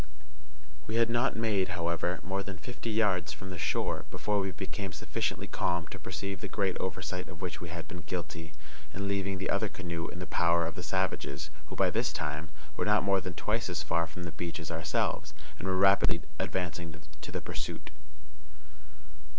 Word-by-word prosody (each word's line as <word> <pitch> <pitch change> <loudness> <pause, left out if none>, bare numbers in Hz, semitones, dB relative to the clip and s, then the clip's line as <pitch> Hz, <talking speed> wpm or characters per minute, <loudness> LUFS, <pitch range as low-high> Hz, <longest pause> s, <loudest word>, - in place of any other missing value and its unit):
We 110 - -1
had 115 0 +5
not 120 +2 +3
made, 100 -5 +2
however, 85 +1 +1
more 95 +2 0
than 100 -2 -5
fifty 115 +7 -5
yards 100 -8 +3
from 95 +5 -7
the 90 - -5
shore - - +1
before 105 -1 +1
we 95 -1 +1
became 95 0 -4
sufficiently 80 - -1
calm 85 -1 +1
to - - -6
perceive 100 0 -3
the - - -2
great 95 -3 +1
oversight 90 0 -2
of 90 -3 -9
which 90 0 -3
we 85 - -4
had 85 0 -5
been 90 - -6
guilty 85 -2 -4 0.4
in 100 +1 -1
leaving 100 -1 +1
the 95 - 0
other 110 - +2
canoe 85 -4 -3
in - - -6
the 90 - -3
power 85 -1 +4
of 80 - -2
the - - -5
savages, 75 +2 0 0.2
who, - - -6
by - - +4
this - - +2
time, 75 +2 -2 0.3
were - - +2
not 105 0 +5
more 100 -1 +4
than 90 -1 -4
twice 110 0 +1
as 85 -1 0
far 85 0 +2
from 85 +3 -7
the 85 - -3
beach 85 +1 -3
as 80 - -4
ourselves, 80 -1 0 0.2
and 95 - -2
were 95 0 +3
rapidly 95 +1 +6 0.2
advancing 85 -3 -1 0.2
to 80 - -5
the - - -1
pursuit. - - -4
90 Hz, 190 wpm, -32 LUFS, 85-100 Hz, 0.4 s, rapidly